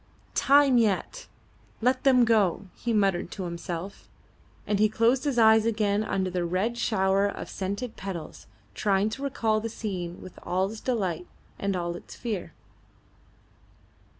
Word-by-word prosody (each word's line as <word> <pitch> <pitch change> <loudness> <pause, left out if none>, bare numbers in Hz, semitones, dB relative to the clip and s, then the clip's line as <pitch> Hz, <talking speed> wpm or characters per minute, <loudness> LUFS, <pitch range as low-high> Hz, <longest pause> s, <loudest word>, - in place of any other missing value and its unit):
"Time 275 -2 +5
yet. 225 - 0 0.5
Let 255 +2 +1
them 250 -3 +6
go," 205 -5 +2
he 235 - -3
muttered 195 -5 +1
to 195 - -5
himself; 175 +2 -6 0.6
and 205 -1 0
he 215 0 +4
closed 235 +5 +2
his 280 -4 0
eyes 220 -1 +6
again 210 -2 +1
under 190 -3 -1
the 180 -1 -1
red 185 +7 -1
shower 195 -4 +2
of 200 - -6
scented 200 +5 -4
petals, 185 -5 -7 0.3
trying 200 - +1
to 265 - -6
recall 225 -6 0
the 230 +1 -4
scene 185 -6 -5
with 185 - -11
all 190 +2 -1
its 220 - -8
delight 190 -9 -2 0.3
and 200 -1 -1
all 175 -1 -2
its - - -10
fear. 215 -7 -4
205 Hz, 150 wpm, -27 LUFS, 185-230 Hz, 0.6 s, them